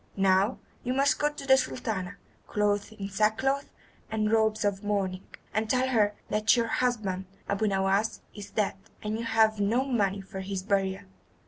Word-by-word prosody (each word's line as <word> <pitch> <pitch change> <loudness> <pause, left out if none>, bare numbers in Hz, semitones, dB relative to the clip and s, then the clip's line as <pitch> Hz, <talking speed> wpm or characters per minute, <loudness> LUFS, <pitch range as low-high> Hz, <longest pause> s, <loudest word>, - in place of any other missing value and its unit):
Now 195 +3 +3 0.3
you 250 - -1
must 275 +1 +3
go 295 - +3
to 285 -2 -8
the 265 -1 +6
Sultana, 200 -7 -2 0.3
clothed 205 0 0
in 200 -2 -5
sackcloth 220 +8 +1 0.4
and 215 -1 0
robes 220 -1 +2
of 200 0 0
mourning, 195 -3 -1 0.3
and 215 0 0
tell 260 +2 +2
her 210 -4 +2 0.2
that 215 +3 +4
your 235 - +2
husband, 215 -6 -1 0.2
Abu 200 +2 0
Nowas, 195 +2 +1
is 205 -1 -9
dead, 210 -3 0 0.3
and 210 0 -2
you 230 - -3
have 220 -1 +3
no 230 +6 +2
money 205 -7 +1
for 195 0 -8
his 190 0 -4
burial. 195 -1 0
210 Hz, 165 wpm, -28 LUFS, 195-230 Hz, 0.4 s, the